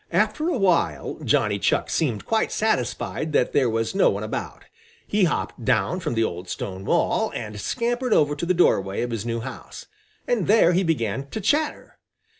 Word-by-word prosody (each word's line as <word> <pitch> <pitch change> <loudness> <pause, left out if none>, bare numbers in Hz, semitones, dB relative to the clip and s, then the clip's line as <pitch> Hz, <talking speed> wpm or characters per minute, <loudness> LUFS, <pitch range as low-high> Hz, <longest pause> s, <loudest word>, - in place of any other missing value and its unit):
After 310 +3 +1
a 345 - 0
while 190 -5 +1
Johnny - - +1
Chuck - - +1
seemed 125 -10 -1
quite 225 -1 0
satisfied 155 - -1
that 125 - +2
there 130 -4 +3
was 115 0 -1
no 195 - +4
one - - -2
about. - - -5 0.4
He 205 -2 +2
hopped 150 -6 -2
down 110 - +1
from 150 - -3
the 115 - +2
old 90 -3 -4
stone 95 0 -5
wall - - +1
and 105 -3 -5
scampered 240 +1 -1
over 145 -6 +3
to 170 +4 -4
the 185 - +2
doorway 95 - +2
of 120 - -3
his 115 0 -3
new 115 0 -2
house, - - -9 0.4
and - - 0
there 205 -5 +5
he 180 - +3
began 135 - -1
to 220 - -5
chatter. 295 +10 -1
145 Hz, 185 wpm, -24 LUFS, -, 0.4 s, there